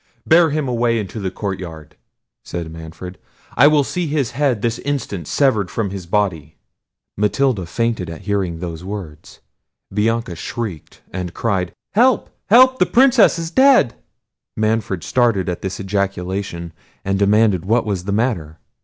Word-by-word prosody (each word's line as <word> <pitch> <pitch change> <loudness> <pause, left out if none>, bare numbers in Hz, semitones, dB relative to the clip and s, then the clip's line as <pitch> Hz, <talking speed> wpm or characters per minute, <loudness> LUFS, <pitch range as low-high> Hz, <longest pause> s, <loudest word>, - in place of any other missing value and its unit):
"Bear 165 0 +5
him 150 -1 -1
away 120 -1 +1
into 105 0 -4
the 95 -2 -2
courtyard," 90 -6 -6 0.5
said 85 -2 -5
Manfred; 80 +3 -9 0.4
"I 145 - +7
will 150 -1 +4
see 175 +4 -3
his 145 -5 -1
head 125 -4 0
this 115 0 0
instant 115 - -3
severed 110 - +2
from 105 -1 -2
his 95 -3 -7
body." 85 -6 -1 0.6
Matilda 105 -2 +1
fainted 115 -3 -1
at 80 - -8
hearing 100 -4 -1
those 85 -1 -6
words. 95 -6 -8 0.5
Bianca 115 -1 0
shrieked, 90 0 -6
and 90 -2 -5
cried—"Help! 115 - 0 0.2
help! 255 +4 +6
the - - +4
Princess 255 -6 +5
is 165 -1 -4
dead!" 260 - +5 0.6
Manfred 110 -5 0
started 115 - +1
at 90 -1 -3
this 95 -1 -4
ejaculation, 95 -3 -3 0.3
and 95 0 0
demanded 100 -2 +3
what 115 +4 +2
was 95 -4 -3
the 100 - -2
matter! 100 -8 -1
100 Hz, 145 wpm, -19 LUFS, 90-120 Hz, 0.6 s, I